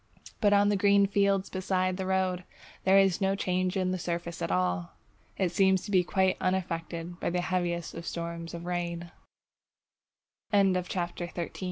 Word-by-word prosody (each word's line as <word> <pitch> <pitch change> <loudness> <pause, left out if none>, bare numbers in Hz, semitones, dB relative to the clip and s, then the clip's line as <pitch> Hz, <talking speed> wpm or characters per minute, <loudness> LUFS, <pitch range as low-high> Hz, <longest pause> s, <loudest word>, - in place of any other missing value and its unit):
But 205 - +3
on 205 0 +5
the 205 - +2
green 200 0 +4
fields 200 -1 +2
beside 185 -1 0
the 190 -1 -3
road, 185 -1 0 0.4
there 190 +1 +6
is 195 -2 +3
no 195 0 +2
change 185 -1 0
in 185 -1 0
the 185 - -2
surface 170 0 -4
at - - -1
all! 90 -1 0 0.4
It 185 -3 +1
seems 190 0 +3
to 205 - -6
be 185 -2 +4
quite 190 +1 +1
unaffected 175 -2 -2
by - - -1
the 180 +1 0
heaviest 175 -2 -2
storm 170 0 -5
of 170 0 -7
rain. 175 -1 -3 1.4
CHAPTER - - +2
XIV - - +6
ON 195 -1 +4
VEGETABLE 180 -1 -2
DEMONS 175 -1 -4
Animals 170 - -4
185 Hz, 180 wpm, -29 LUFS, 170-190 Hz, 1.4 s, there